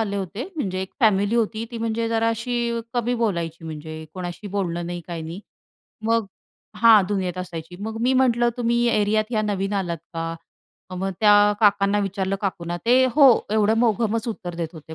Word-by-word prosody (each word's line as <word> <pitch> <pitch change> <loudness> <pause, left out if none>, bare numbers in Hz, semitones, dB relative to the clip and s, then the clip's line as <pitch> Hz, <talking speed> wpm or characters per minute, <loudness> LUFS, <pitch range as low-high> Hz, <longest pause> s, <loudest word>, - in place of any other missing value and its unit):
आले 200 -2 -1
होते. 200 - -5
म्हणजे 185 -9 -2
एक 190 - -7
फॅमिली 205 -1 +3
होती. 225 -1 0
ती 235 - -6
म्हणजे 230 0 -1
जरा 225 0 +1
अशी 235 +1 -1
अ, - - -2
कमी 240 0 0
बोलायची. 170 -8 -2
म्हणजे 155 0 -7
कोणाशी 175 +1 -6
बोलणं 175 -4 -2
नाही, 175 0 -5
काही 170 -2 -5
नाही. 165 +4 -7 0.6
मग 230 -1 +1 0.5
हां, 220 -1 +7
दुनियेत 185 -3 -2
असायची. 175 -1 -7
मग 220 +1 -4
मी 250 +2 +3
म्हटलं 240 -2 +3
तुम्ही 235 -1 +1
या 235 - +2
एरियात 215 +2 +1
या 215 -2 +1
नवीन 200 -1 -2
आलात 170 -2 -4 0.2
का? 165 0 -3 0.6
अ, - - -6
मग 190 +2 -2
त्या 205 -1 +6
काकांना 200 -1 +3
विचारलं 195 -1 -1
काकूंना, 175 -3 -3
ते 255 +2 +5
हो, 280 -2 +8 0.2
एवढं 215 +1 +3
मोघमच 230 0 +1
उत्तर 190 -6 -5
देत 170 -1 -3
होते, 160 -1 -11
205 Hz, 185 wpm, -23 LUFS, 180-230 Hz, 0.6 s, हो